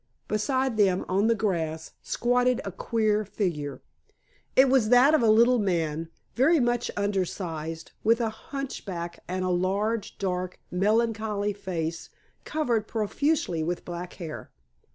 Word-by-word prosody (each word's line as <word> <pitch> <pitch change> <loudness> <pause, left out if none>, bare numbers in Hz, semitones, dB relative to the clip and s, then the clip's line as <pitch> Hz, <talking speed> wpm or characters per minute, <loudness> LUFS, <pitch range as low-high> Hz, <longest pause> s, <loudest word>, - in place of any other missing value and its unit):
Beside 260 +3 0
them, 190 -3 +3
on 195 +4 +2
the 230 - +3
grass, 165 -7 -2
squatted 245 +1 +1
a 195 - -3
queer 215 +2 0
figure. 170 -9 -3 0.7
It 265 +1 +7
was 255 -5 +3
that 250 +5 +6
of 310 - +4
a 230 - +4
little 235 +3 +5
man, 165 -5 -1 0.2
very 300 +7 +4
much 240 -1 +1
under 200 -2 +1
sized, 165 -3 -5
with 230 +2 +4
a 230 -2 +1
hunch 275 +4 -6
back 170 -3 -5
and 185 +1 -2
a - - 0
large, 200 +5 0
dark, 185 -1 -2
melancholy 210 +1 +1
face 170 -4 -4 0.4
covered 240 -9 0
profusely 225 - 0
with 170 +2 -3
black 175 0 -6
hair. 165 -4 -7
205 Hz, 140 wpm, -27 LUFS, 180-235 Hz, 0.7 s, It